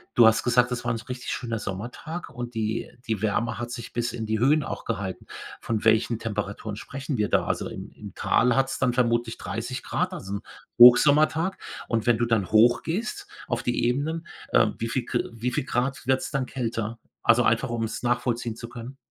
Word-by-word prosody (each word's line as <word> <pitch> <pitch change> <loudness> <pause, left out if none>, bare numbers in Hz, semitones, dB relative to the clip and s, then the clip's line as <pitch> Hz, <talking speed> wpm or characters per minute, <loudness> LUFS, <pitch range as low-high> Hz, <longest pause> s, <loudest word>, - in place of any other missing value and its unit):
Du 120 - +7
hast 110 - +4
gesagt, 120 0 +3
das 120 - -3
war - - 0
'n 115 - -1
so 115 - -10
richtig 125 0 -5
schöner 115 -2 -3
Sommertag 125 - -6
und 120 -1 -6
die 110 0 -2 0.2
die 110 -3 -1
Wärme 110 +1 0
hat 120 0 -4
sich 120 -2 -7
bis 120 0 -1
in 110 -2 -4
die 110 0 -1
Höhen 145 +4 +4
auch - - -5
gehalten. 100 -4 -4 0.3
Von 110 -2 -2
welchen 110 +1 +3
Temperaturen 105 -1 -4
sprechen 135 +3 -5
wir 105 -1 +1
da? - - +2
Also - - -2
im - - -8
im - - -10
Tal 125 0 +2
hat's 135 0 +1
dann 125 -2 +2
vermutlich 120 -2 +1
30 120 +4 -5
Grad, 180 +1 -1
also 100 - -6
'n 100 - -3 0.4
Hochsommertag. 150 +8 +7 0.3
Und 115 0 -1
wenn 120 -2 +5
du 120 - +1
dann 110 -5 0
hochgehst 170 - +2 0.2
auf 120 0 -1
die 120 -1 0
Ebenen, 155 +7 -1 0.3
äh, - - +5
wie 115 0 -2
viel 125 -1 -1
Gr - - -1
wie 120 +2 -2
viel 125 - -1
Grad 130 +2 -1
wird's 130 +2 +1
dann 135 -3 -1
kälter? 115 -3 -3 0.3
Also 120 +1 +5
einfach, 115 +3 +2
um's 115 -1 -3
nachvollziehen 120 -1 0
zu 120 - -8
können. 120 +2 -9
120 Hz, 200 wpm, -26 LUFS, 115-130 Hz, 0.4 s, Du